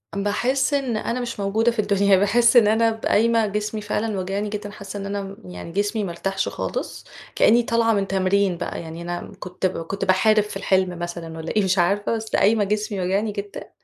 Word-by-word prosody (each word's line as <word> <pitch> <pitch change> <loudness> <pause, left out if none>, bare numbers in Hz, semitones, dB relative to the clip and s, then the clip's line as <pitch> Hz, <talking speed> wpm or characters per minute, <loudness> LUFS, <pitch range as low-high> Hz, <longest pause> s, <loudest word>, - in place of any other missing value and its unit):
باحس 245 +8 0
إن 265 -5 0
أنا 235 +3 -2
مش 240 -3 -5
موجودة 215 +4 +1
في 230 - -6
الدنيا، 200 -1 +3
باحس 230 +5 +3
إن 225 -3 +7
أنا 225 +1 +3
ب 220 0 -7
قايمة 230 +1 +3
جسمي 210 +1 -3
فعلًا 210 0 -2
واجعني 195 +3 -2
جدًا، 210 0 -5
حاسّة 200 -1 -8
إن 195 - -5
أنا 200 0 -5
يعني 90 - -8
جسمي 205 +3 -1
ما 185 - -3
ارتاحش 195 +3 -2
خالص، - - -5 0.3
كأنّي 235 +2 +5
طالعة 230 -1 +2
من 200 -2 0
تمرين 190 -1 +1
بقى 170 - -4
يعني 165 0 -8
أنا 175 0 -5
كنت 180 +1 -5
كنت 185 +2 -2
باحارب 210 +3 +4
في 210 -1 -6
الحلم 185 -2 0
مثلًا 170 -1 -6
والَّا 160 0 -5
إيه 210 - +3
مش 190 0 +1
عارفة، 200 +5 +1
بس 220 -1 -4
قايمة 210 +1 +3
جسمي 210 0 -2
واجعني 195 +4 0
جدًا، 200 -1 -7
205 Hz, 200 wpm, -22 LUFS, 190-220 Hz, 0.3 s, إن